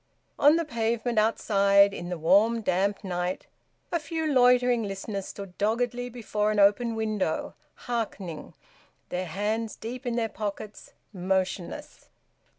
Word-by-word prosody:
On 290 Hz, +2 st, +6 dB
the 335 Hz, 0 st, 0 dB
pavement 235 Hz, -2 st, 0 dB
outside, 200 Hz, -2 st, +4 dB
in 175 Hz, -1 st, -6 dB
the 180 Hz, -, -3 dB
warm 210 Hz, +8 st, +3 dB
damp 200 Hz, +1 st, 0 dB
night, 180 Hz, -1 st, -3 dB, 0.5 s
a 340 Hz, -, +1 dB
few 320 Hz, +1 st, -3 dB
loitering 250 Hz, -3 st, +4 dB
listeners 195 Hz, -1 st, -4 dB
stood 195 Hz, -3 st, -9 dB
doggedly 245 Hz, +3 st, 0 dB
before 215 Hz, -3 st, -2 dB
an 215 Hz, -, 0 dB
open 205 Hz, +3 st, +4 dB
window, 215 Hz, -7 st, -1 dB, 0.3 s
hearkening, 200 Hz, -9 st, -4 dB, 0.5 s
their 180 Hz, +1 st, -3 dB
hands 215 Hz, +4 st, -2 dB
deep 245 Hz, +3 st, -7 dB
in 240 Hz, -, -1 dB
their 230 Hz, -1 st, 0 dB
pockets, 210 Hz, -1 st, -6 dB, 0.2 s
motionless. 185 Hz, -1 st, -3 dB
215 Hz, 130 wpm, -27 LUFS, 195-235 Hz, 0.5 s, On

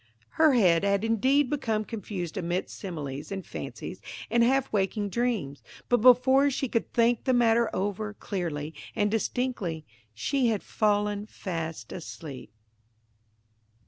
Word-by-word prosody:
Her 315 Hz, -3 st, +4 dB
head 180 Hz, -8 st, +4 dB
had 200 Hz, 0 st, +2 dB
indeed 260 Hz, +6 st, +3 dB
become 225 Hz, -6 st, -1 dB
confused 195 Hz, -7 st, -5 dB
amidst 180 Hz, 0 st, -2 dB
similes, 145 Hz, -7 st, -6 dB
and 195 Hz, -1 st, -4 dB
fancies, -, -, -7 dB, 0.3 s
and 235 Hz, -, +4 dB
half 265 Hz, +1 st, +2 dB
waking 205 Hz, +1 st, 0 dB
dreams; 215 Hz, -, -1 dB, 0.3 s
but 245 Hz, -, +5 dB
before 260 Hz, +3 st, +6 dB
she 270 Hz, 0 st, -1 dB
could 230 Hz, -1 st, -1 dB
think 235 Hz, 0 st, +2 dB
the 260 Hz, -, +3 dB
matter 235 Hz, -1 st, +4 dB
over, 205 Hz, +2 st, -2 dB
clearly 160 Hz, -7 st, -4 dB, 0.2 s
and 205 Hz, -2 st, +1 dB
distinctly, 215 Hz, -8 st, -2 dB, 0.3 s
she 255 Hz, -, +1 dB
had 220 Hz, -3 st, 0 dB
fallen 210 Hz, -1 st, 0 dB
fast 165 Hz, -6 st, -5 dB
asleep. 150 Hz, -, -8 dB
210 Hz, 130 wpm, -28 LUFS, 180-240 Hz, 0.3 s, before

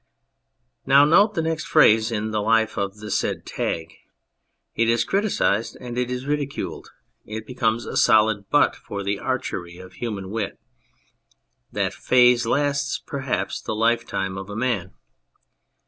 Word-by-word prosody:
Now 140 Hz, +2 st, +6 dB
note 205 Hz, +8 st, +4 dB
the 165 Hz, -, 0 dB
next 160 Hz, 0 st, -2 dB
phase 110 Hz, -7 st, +5 dB
in 110 Hz, 0 st, -2 dB
the 105 Hz, -1 st, 0 dB
life 110 Hz, +1 st, +2 dB
of 100 Hz, 0 st, -3 dB
the 105 Hz, 0 st, -8 dB
said -, -, -1 dB
tag. 80 Hz, 0 st, -3 dB, 0.8 s
It 115 Hz, 0 st, +1 dB
is 115 Hz, 0 st, +3 dB
criticised 195 Hz, -, 0 dB
and 120 Hz, -1 st, -7 dB
it 125 Hz, 0 st, -1 dB
is 125 Hz, +1 st, -4 dB
ridiculed; 145 Hz, -1 st, -3 dB, 0.3 s
it 110 Hz, +1 st, -7 dB
becomes 120 Hz, -1 st, -1 dB
a -, -, -6 dB
solid 110 Hz, -3 st, +3 dB
butt 145 Hz, -, +3 dB
for 100 Hz, 0 st, -7 dB
the 100 Hz, 0 st, -2 dB
archery 95 Hz, -9 st, -4 dB
of 90 Hz, 0 st, -12 dB
human 100 Hz, -5 st, -5 dB
wit. 105 Hz, -3 st, -4 dB, 1.1 s
That -, -, -1 dB
phase 125 Hz, -2 st, +4 dB
lasts, 140 Hz, +1 st, 0 dB
perhaps, 130 Hz, -9 st, -3 dB
the 110 Hz, -, -4 dB
lifetime 110 Hz, -4 st, 0 dB
of 95 Hz, +1 st, -9 dB
a 105 Hz, -, -6 dB
man. 110 Hz, -7 st, -2 dB
115 Hz, 145 wpm, -23 LUFS, 105-130 Hz, 1.1 s, Now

